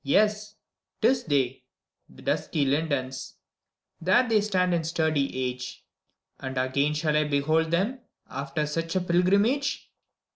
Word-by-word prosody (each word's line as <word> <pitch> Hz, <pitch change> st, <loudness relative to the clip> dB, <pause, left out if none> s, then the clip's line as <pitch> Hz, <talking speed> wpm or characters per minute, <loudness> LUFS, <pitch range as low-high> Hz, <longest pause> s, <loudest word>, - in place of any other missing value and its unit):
YES! 210 Hz, +7 st, +2 dB, 0.5 s
't 220 Hz, -, +5 dB
is 255 Hz, -1 st, +1 dB
they, 135 Hz, -4 st, 0 dB, 0.5 s
the -, -, -15 dB
dusky 145 Hz, -3 st, 0 dB
lindens; 135 Hz, -2 st, -1 dB, 0.7 s
There 190 Hz, +9 st, +4 dB
they 220 Hz, -2 st, +3 dB
stand 185 Hz, -3 st, +1 dB
in 170 Hz, -1 st, +1 dB
sturdy 160 Hz, -4 st, +1 dB, 0.2 s
age: 125 Hz, 0 st, -6 dB, 0.5 s
And 130 Hz, 0 st, -5 dB
again 140 Hz, +4 st, +1 dB
shall 150 Hz, 0 st, 0 dB
I 150 Hz, 0 st, +3 dB
behold 155 Hz, +3 st, +1 dB
them, 200 Hz, +10 st, 0 dB, 0.3 s
After 140 Hz, +2 st, -3 dB
such 165 Hz, +3 st, -3 dB
a 185 Hz, -, +2 dB
pilgrimage? 200 Hz, +10 st, +1 dB
160 Hz, 135 wpm, -27 LUFS, 140-190 Hz, 0.7 s, t